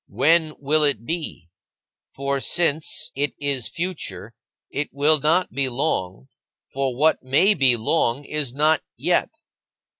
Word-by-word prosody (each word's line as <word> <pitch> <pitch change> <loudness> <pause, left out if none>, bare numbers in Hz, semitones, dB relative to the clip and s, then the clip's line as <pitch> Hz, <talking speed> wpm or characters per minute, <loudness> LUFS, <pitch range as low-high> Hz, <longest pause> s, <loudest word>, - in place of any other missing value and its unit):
When 155 +8 +2
will 150 +2 +1
it 130 -6 +1
be? 155 - -4 0.7
For 140 0 -2
since 160 -1 +1
it 145 +1 -1
is 140 -4 0
future, 150 - -5 0.4
it 145 - -3
will 145 +2 +3
not 165 +6 +1
be 135 -1 0
long, 95 - -3 0.5
for 135 -2 -2
what 155 +3 +2
may 145 +11 +3
be 130 -8 +3
long 120 +2 0
is 150 -4 -2
not 150 +3 +2 0.2
yet. - - +1
145 Hz, 130 wpm, -22 LUFS, 130-155 Hz, 0.7 s, will